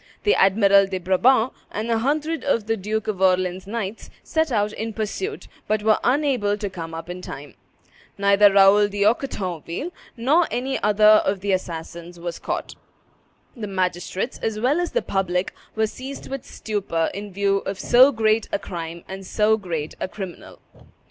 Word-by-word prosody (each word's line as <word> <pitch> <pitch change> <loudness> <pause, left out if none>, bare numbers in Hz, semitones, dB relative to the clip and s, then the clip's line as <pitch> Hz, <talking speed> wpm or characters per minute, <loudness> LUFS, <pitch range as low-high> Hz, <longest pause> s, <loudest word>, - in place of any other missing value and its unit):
The 415 - +4
Admiral 195 0 +5
de 190 -1 -3
Brabant, 220 +7 +3 0.2
and 220 +3 -3
a 225 - +2
hundred 300 +4 -1
of 230 -7 +1
the 225 0 0
Duke 215 +1 -3
of 200 -3 -3
Orleans' 185 0 +1
knights, 215 -1 -5
set 320 -2 0
out 210 -2 +1
in 220 +1 -4
pursuit, 300 - -4 0.2
but 215 0 0
were 215 0 +4
unable 250 -6 +1
to 205 -2 -4
come 165 -3 -7
up 165 - -7
in 180 +1 -6
time. 145 -4 -9 0.6
Neither 200 0 +5
Raoul 200 +1 +6
d'Anquetonville 200 - -1 0.3
nor 295 +9 +3
any 265 +2 -2
other 210 +1 +6
of 195 -1 -1
the 200 0 -1
assassins 170 -1 -4
was 170 0 -5
caught. - - -4 0.8
The 220 -4 -5
magistrates, 185 +3 -2
as 220 -1 -2
well 265 +8 +2
as 350 - -2
the - - +1
public, 185 -1 -1 0.2
were 220 0 +2
seized 260 +5 -8
with 270 -2 -5
stupor 195 -7 -2
in 205 0 -6
view 195 +1 +1
of 195 0 -5
so 255 +7 +6
great 220 -2 +1
a - - +1
crime 170 -3 -7
and 190 0 -7
so 215 +3 +2
great 165 -7 -4
a - - -2
criminal. 190 -2 -8
205 Hz, 170 wpm, -23 LUFS, 185-225 Hz, 0.8 s, Raoul